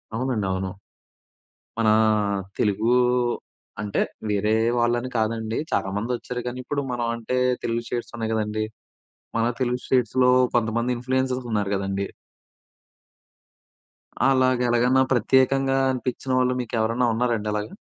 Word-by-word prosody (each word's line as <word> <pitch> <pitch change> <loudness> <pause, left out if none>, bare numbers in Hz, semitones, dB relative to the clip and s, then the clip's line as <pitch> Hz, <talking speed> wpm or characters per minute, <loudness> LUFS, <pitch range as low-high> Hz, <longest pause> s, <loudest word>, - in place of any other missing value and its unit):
అవునండి. 120 -4 -1
అవును. 95 0 -2 1.1
మనా 110 -1 +4 0.7
తెలుగు 110 +3 +2 0.9
అంటే, 105 -1 -1 0.3
వేరే 105 +1 +1 0.3
వాళ్ళని 120 +1 +1
కాదండి. 110 0 -1
చాలామంది 105 +5 -1
వచ్చారు 125 +1 -5
కానీ, 125 +1 -4
ఇప్పుడు 140 +2 -2
మనం 120 -1 -1
అంటే 115 +2 -3 0.3
తెలుగు 115 0 -1
స్టేట్స్ 120 - -4
ఉన్నాయి 110 -1 -2
గదండీ. 110 0 -1 0.7
మన 115 - +2 0.2
తెలుగు 125 0 0
స్టే‌ట్స్‌లో, 125 0 +3 0.2
కొంతమంది 115 +1 +1
ఇన్‌ఫ్లూ‌యన్సర్స్ 130 0 -1
ఉన్నారు 105 -2 0
గదండి. 100 0 -2 2.2
అలాగా 130 -2 +3
ఎలాగన్నా 125 +2 +3
ప్రత్యేకంగా 135 +3 +3
అనిపించిన 130 +1 -3
వాళ్ళు 125 0 +2
మీకెవరన్నా 115 +1 0
ఉన్నారండి 115 -2 0
అలాగా? 105 +7 -3
120 Hz, 110 wpm, -24 LUFS, 110-125 Hz, 2.2 s, మనా